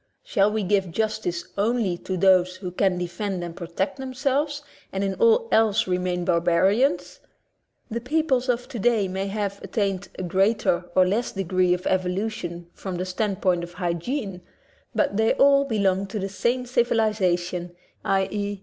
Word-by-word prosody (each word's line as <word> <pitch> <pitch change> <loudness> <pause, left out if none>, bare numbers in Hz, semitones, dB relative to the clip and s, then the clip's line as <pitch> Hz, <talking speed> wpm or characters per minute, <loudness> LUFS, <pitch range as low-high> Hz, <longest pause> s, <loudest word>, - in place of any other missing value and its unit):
Shall 200 +1 +2
we 215 -1 -1
give 195 -1 +1
justice 215 -3 -2
only 215 -3 +1
to 185 - -4
those 185 -1 +4
who 185 -1 -6
can 185 0 +1
defend 180 +1 -3
and 170 -1 -6
protect 185 +2 -3
themselves 275 +3 -1 0.3
and 195 +1 -2
in 195 -1 0
all 460 - +3
else 220 0 +3
remain 180 -1 -1
bar 170 -2 +2
barians? 180 +2 +2 0.7
The 235 +1 -2
peoples 260 -1 0
of 245 0 0
today 230 -3 +1
may 190 +1 -3
have 200 0 -3
at - - -10
tained 200 -3 0
a - - -4
greater 185 -1 +1
or 185 - +6
less 225 +6 0
degree 185 -1 +1
of 180 - -9
evolution 180 -2 -2
from 190 -2 -6
the 180 +1 -2
standpoint 185 -2 0
of 170 0 -8
hygiene, 180 - -3 0.5
but 200 - +1
they 220 0 +3
all 280 0 +5
belong 200 -5 +1
to 210 +3 -5
the 195 -1 -3
same 240 +6 0
civilization, 185 -8 0 0.3
i.e. 200 0 -1
195 Hz, 160 wpm, -24 LUFS, 180-225 Hz, 0.7 s, or